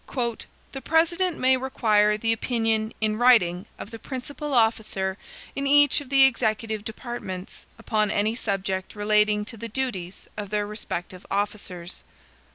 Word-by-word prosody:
"The 270 - -7
President 335 +2 +2
may 260 +1 +4
require 215 -5 +2
the 225 +1 +1
opinion, 225 -1 0
in 215 0 +1
writing, 195 -8 +4
of 210 - -9
the 225 - -8
principal 285 +4 -6
officer 220 -4 +1 0.4
in 275 0 -1
each 290 0 +5
of 275 - -11
the 275 -1 +6
executive 220 -4 +1
departments, 220 -5 -7
upon 215 -2 0
any 210 +3 +1
subject 195 -4 -3
relating 210 0 +2
to 230 +1 -7
the 230 +2 -6
duties 200 -7 -3
of 205 -2 -6
their 210 0 0
respective 190 -3 -6
officers." 195 -3 -4
220 Hz, 140 wpm, -25 LUFS, 205-255 Hz, 0.4 s, the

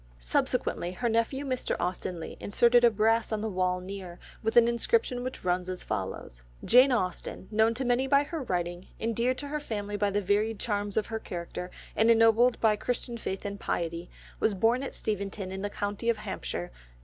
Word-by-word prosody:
Subsequently - - 0
her 240 +6 -1
nephew 230 +5 0
Mr. 255 -2 -1
Austen 180 0 -3
Leigh 160 - -7
inserted 240 +3 +4
a 240 - +8
brass 225 +1 +2
on 215 - 0
the 220 - -1
wall 185 -1 0
near 185 -1 -7 0.2
with 225 0 -1
an 235 -1 +8
inscription 245 - +1
which 255 0 -6
runs 180 0 0
as 185 -1 -5
follows: - - -4 0.2
"Jane 255 +3 +7
Austen, 185 -4 -2
known 220 +1 +3
to 260 +2 -2
many 245 +2 +2
by 280 +1 +4
her 320 +1 -5
writing, 175 -5 -3
endeared 235 +3 0
to 290 - -5
her 300 +1 -2
family 205 -7 -4
by 205 0 +1
the 200 +1 0
varied 205 +3 +1
charms 205 -2 -1
of 215 - +2
her 225 -1 -4
character, 180 -1 -6 0.3
and 220 +1 +4
ennobled 230 +2 +5
by 220 -2 +4
Christian 240 +2 -3
faith 195 -3 -5
and 200 0 -4
piety, 170 -1 -3 0.3
was 215 - +2
born 230 +6 +2
at 275 - -5
Steventon 200 -2 -3
in 190 0 -5
the 205 - -2
county 205 +3 -2
of 230 - +2
Hampshire 190 - -5
Dec. - - -22
215 Hz, 195 wpm, -29 LUFS, 185-235 Hz, 0.3 s, a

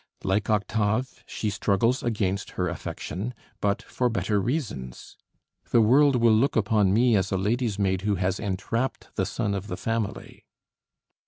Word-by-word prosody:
Like 100 +2 0
Octave, 110 +4 0
she 105 - -2
struggles 110 +6 +1
against 100 -4 -1
her 90 - +1
affection, 100 +7 -5 0.2
but 100 0 0
for 125 -1 -1
better 105 -1 0
reasons: 105 - -4 0.5
"The 120 - +4
world 135 +5 +5
will 115 -2 +4
look 120 +6 +2
upon 105 -2 +3
me 115 +3 +4
as 95 -1 0
a 95 - +1
lady's 110 +2 0
maid 95 -2 +1
who 105 0 +1
has 95 +1 -1
entrapped 110 +5 -2
the 95 -2 0
son 105 -1 -2
of 100 0 -4
the 90 - -4
family." 115 -3 -3
105 Hz, 155 wpm, -26 LUFS, 95-115 Hz, 0.5 s, world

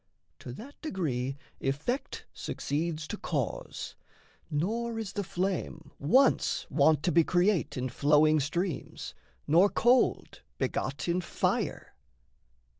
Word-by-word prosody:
To - - -8
that 270 - -11
degree 135 - -2 0.2
effect 145 - -2
succeeds 155 +1 -3
to - - -4
cause, - - -3 0.6
Nor 225 +10 -1
is 215 -3 -4
the 205 - -2
flame 180 -3 -3
once 255 - +3
wont 155 -2 +4
to 175 - +2
be 170 -1 +5
create 180 -1 +1
In 125 +1 -1
flowing 150 +4 +4
streams, 165 +2 -3 0.3
nor 175 +7 +5
cold 245 +5 +2 0.2
begot 135 +4 -2
in 175 +1 +1
fire. 170 - -1
170 Hz, 115 wpm, -30 LUFS, 145-200 Hz, 0.6 s, be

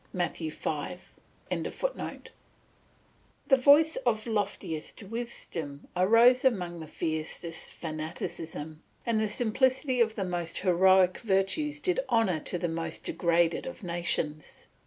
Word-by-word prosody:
Matt. 175 -2 -1
v.] 160 -2 -2
The 180 - -6 1.0
voice 290 +4 +6
of 220 - 0
loftiest 205 -6 -3
wisdom 190 -10 -6
arose 230 +7 +5
among 180 -9 +1
the 160 - -8
fiercest 160 +1 -3
fanaticism, 155 -1 -6 0.2
the 220 -2 +1
simplicity 250 +4 +1
of 220 -1 +2
the 195 - -2
most 175 -2 -3
heroic 185 0 +4
virtues 225 +9 0
did 365 +9 0
honour 190 -8 +2
to 180 - -2
the 175 - -1
most 165 0 -4
degraded 170 -1 +1
of 260 -3 -8
nations. 170 -4 -2
185 Hz, 110 wpm, -29 LUFS, 165-230 Hz, 1.0 s, voice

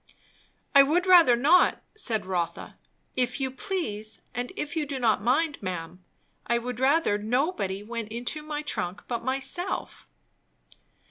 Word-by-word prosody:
"I 280 - +9
would 320 +6 +2
rather 345 -9 +7
not," 290 +9 +4
said 235 - -1
Rotha. 180 -3 -3 0.4
"If 250 +1 0
you 265 -1 -1
please, 265 - -3
and 245 +1 -4
if 295 -4 -4
you 305 -2 -1
do 275 -1 -3
not 225 -5 +2
mind, 285 +7 +1
ma'am, 180 -1 -6 0.4
I 235 - +2
would 245 0 -5
rather 265 -5 +3
nobody 215 - -1
went 230 0 -5
into 245 +7 -3
my 300 0 -5
trunk 180 -9 -4
but 235 -2 -3
myself." 270 +8 -2
250 Hz, 140 wpm, -27 LUFS, 215-300 Hz, 0.4 s, I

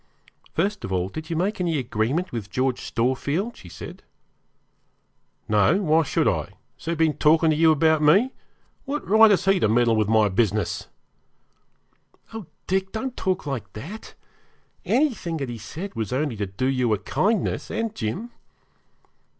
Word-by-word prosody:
'First 200 +5 0
of 95 - -5
all, 90 0 0
did 155 +9 -7
you 165 - -2
make 190 +4 -1
any 170 -3 0
agreement 130 - -1
with 110 -5 -5
George 130 +4 -1
Storefield?' 140 - -1
she 90 - -13
said. - - -9 1.5
'No; 105 - +3
why 165 -4 +3
should 155 - 0
I? - - +1 0.3
Has - - -16
he 170 +1 -1
been 160 -3 +1
talking 160 +1 +4
to - - +2
you 160 +1 +5
about 155 0 +3
me? 195 - +4 0.5
What 295 +2 -4
right 220 +2 +7
has 200 -3 +2
he 195 -1 +4
to - - +3
meddle 115 0 +3
with 110 -2 +1
my 110 -1 +4
business?' 105 -1 0 1.5
'Oh, 220 -6 -7 0.2
Dick, 190 +1 -1
don't 250 +3 -4
talk 185 -3 -1
like 125 -9 -4
that. 175 - -9 0.7
Anything 245 - 0
that 135 -4 -4
he 120 -1 -6
said 170 - -7
was 110 -4 -4
only 135 -1 -1
to 100 -1 -3
do 100 +7 -3
you 125 -3 +1
a - - -5
kindness, 195 - -1
and 225 -1 -2
Jim.' 190 - -4
155 Hz, 165 wpm, -24 LUFS, 115-190 Hz, 1.5 s, right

